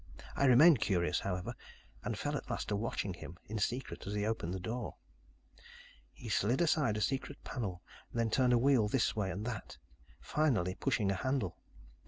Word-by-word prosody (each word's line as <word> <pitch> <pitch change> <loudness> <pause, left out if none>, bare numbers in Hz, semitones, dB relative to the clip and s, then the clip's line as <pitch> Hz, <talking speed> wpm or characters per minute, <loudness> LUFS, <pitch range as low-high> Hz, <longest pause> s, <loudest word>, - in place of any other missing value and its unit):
I 140 - +2
remained 135 +3 +7
curious, 90 -5 +1
however, 95 +4 -3 0.5
and - - -2
fell - - -2
at - - -5
last - - -3
to 105 - +1
watching 100 -2 -2
him 85 -1 -9
in 110 +1 -4
secret 120 +3 -2
as 100 - -3
he 105 0 0
opened 110 -6 -1
the 95 - -3
door. 110 +6 -4 1.2
"He - - -11
slid 120 +6 +2
aside 150 -9 +2
a - - -2
secret 135 +4 -1
panel, 95 -9 -4 0.3
then 115 -1 0
turned 125 +1 +4
a - - +6
wheel 125 -3 +4
this 115 0 +1
way 100 -3 0
and 100 +4 -4
that, 110 - -5 0.4
finally 120 - +1
pushing 100 +1 0
a - - 0
handle. 125 -4 -1
110 Hz, 180 wpm, -34 LUFS, 100-130 Hz, 1.2 s, remained